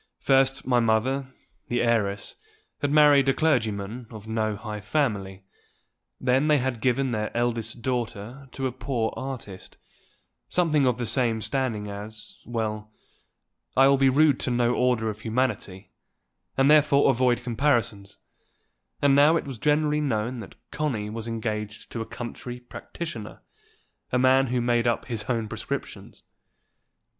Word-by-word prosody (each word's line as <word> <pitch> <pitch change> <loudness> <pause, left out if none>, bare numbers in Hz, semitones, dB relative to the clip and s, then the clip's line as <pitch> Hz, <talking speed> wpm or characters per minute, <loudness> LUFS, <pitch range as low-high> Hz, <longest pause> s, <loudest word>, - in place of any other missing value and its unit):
First 135 0 +2
my 125 -2 +3
mother, 130 +4 +1 0.4
the 120 0 0
heiress, 105 -4 0 0.5
had 145 - +1
married 145 -2 +6
a 135 - +2
clergyman 115 -6 0
of 110 -3 -10
no 110 -1 -1
high 105 0 -6
family; 105 -6 -1 0.8
then 130 +3 +2
they 150 -1 +5
had 125 -3 -2
given 130 +1 +1
their 105 -2 -1
eldest 115 -1 -2
daughter 125 +1 -4
to 135 - -3
a 130 - 0
poor 120 -3 -2
artist, 130 -8 -7 0.7
something 155 -6 +2
of 125 -2 +1
the 120 - -2
same 115 -1 +1
standing 115 -4 -2
as 105 +1 -8
well, 110 -2 -3 0.9
I 135 +1 +7
will 140 0 +5
be 135 -1 +5
rude 145 0 +4
to - - 0
no 120 0 +2
order 125 -3 +1
of 105 0 -11
humanity, 110 -5 -2 0.7
and 135 0 +4
therefore 145 -2 +5
avoid 125 -1 +1
comparisons; 115 -5 0 0.9
and 140 -1 +5
now 150 +4 +6
it - - -4
was 135 -5 -7
generally 150 0 +2
known 120 -3 -1
that 105 - -10 0.2
Connie 120 -9 -2
was 115 +1 -5
engaged 105 -2 -4
to 115 - -4
a 115 - -5
country 120 0 -7
practitioner, 120 -1 -8 0.7
a 125 - +2
man 130 +1 +4
who 125 0 0
made 120 0 +2
up 120 - 0
his 115 -4 -4
own 115 -2 -1
prescriptions. - - -6
120 Hz, 145 wpm, -26 LUFS, 110-135 Hz, 0.9 s, I